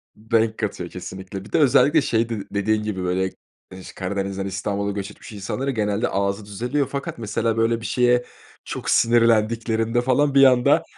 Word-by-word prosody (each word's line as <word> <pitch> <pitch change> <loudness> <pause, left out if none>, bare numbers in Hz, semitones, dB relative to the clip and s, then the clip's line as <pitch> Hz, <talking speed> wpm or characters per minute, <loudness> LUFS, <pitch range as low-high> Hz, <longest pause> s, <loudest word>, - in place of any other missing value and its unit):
Renk 110 0 0
katıyor, 95 -5 -3
kesinlikle. 95 +2 -8
Bir - - -14
de - - +2
özellikle 145 +2 +5
şey 115 -2 0
dedi 110 -4 -4
dediğin 105 +1 0
gibi, 95 -4 -3
böyle, 95 +1 0 0.6
Karadeniz'den 95 0 -3
İstanbul'a 100 +1 -2
göç 100 -1 -5
etmiş - - -13
insanların 125 +7 -3
genelde 105 +1 0
ağzı 100 +1 -1
düzeliyor 125 +8 -2
fakat 140 -3 -4
mesela 110 0 -1
böyle 115 0 +1
bir - - -8
şeye 125 +2 +2 0.4
çok - - -5
sinirlendiklerinde 115 0 +2
falan, 140 +3 +1
bir 135 - +7
anda 125 -2 +5
110 Hz, 160 wpm, -22 LUFS, 100-120 Hz, 0.6 s, bir